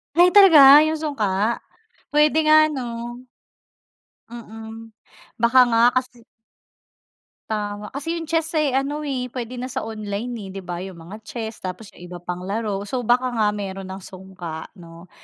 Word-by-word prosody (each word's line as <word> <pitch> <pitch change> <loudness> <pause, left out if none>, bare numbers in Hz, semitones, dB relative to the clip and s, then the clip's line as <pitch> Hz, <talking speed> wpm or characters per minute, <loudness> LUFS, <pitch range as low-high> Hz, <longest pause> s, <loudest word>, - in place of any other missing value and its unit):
Ay, 355 +1 +5
talaga 300 -7 +9
'yung 310 0 0
sungka? 220 -7 -1 0.5
Pwede 300 +1 +3
nga 310 0 +6
'no? 240 -4 -6 1.1
Mm. 225 -1 -10 0.5
Baka 240 +2 +5
nga 230 - +3 0.2
kasi 250 -2 -2 1.3
Tama, 210 -1 -4
kasi 290 +5 -4
yung 325 -2 -6
chess 325 0 -1
eh, 305 -3 +2
ano 290 +2 -3
eh, 260 -4 -3
puwede 250 0 -7
na 250 - -4
sa 255 - -4
online, 215 +1 -5 0.2
eh, - - -8
di 195 - -6
ba? 175 -1 -6
'Yung 190 +1 -7
mga 170 +6 -11
chess, 225 -2 -6
tapos 190 +3 -7
'yung 175 - -13
iba 175 0 -9
pang 180 +1 -6
laro. 205 -1 -3
So, 245 +4 -3
baka 245 +3 +2
nga 225 -4 +1
meron 195 -2 -6
ng 190 - -6
sungka 185 -4 -9
'no? 170 +1 -14
230 Hz, 160 wpm, -22 LUFS, 195-275 Hz, 1.3 s, talaga